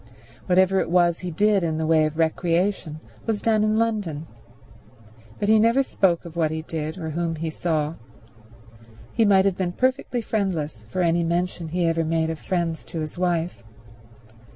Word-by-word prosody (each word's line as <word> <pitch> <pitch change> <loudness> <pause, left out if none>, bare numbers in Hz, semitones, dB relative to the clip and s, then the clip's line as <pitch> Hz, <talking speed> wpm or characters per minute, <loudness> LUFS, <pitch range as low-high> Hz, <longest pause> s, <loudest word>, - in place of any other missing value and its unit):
Whatever 190 +1 +4
it - - -1
was 175 -1 +3
he 180 - -5
did 205 +4 +2
in 160 -2 -1
the 160 - -1
way 155 -1 +4
of 155 0 -7
recreation 165 0 0 0.3
was 220 -2 0
done 220 -1 +2
in 215 0 +2
London, 205 -10 -1 1.1
but 205 - -2
he 220 0 +5
never 230 +5 +4
spoke 175 -9 +1
of 170 -1 -10
what 160 -2 +1
he 160 0 -4
did 160 +1 -4
or 160 -3 -4
whom 165 +1 -2
he 160 0 -3
saw; 155 -2 -1 1.2
he 225 - +3
might 195 -2 +5
have 195 -2 +1
been 180 -2 -1
perfectly 255 +1 0
friendless 165 - -2
for 180 +10 -1
any 170 0 +2
mention 170 0 -1
he 175 +2 -1
ever 165 0 +1
made 160 0 0
of 160 - -6
friends 170 -3 -2
to 165 - -6
his 155 -1 -5
wife. 175 -5 -1
170 Hz, 175 wpm, -24 LUFS, 160-195 Hz, 1.2 s, he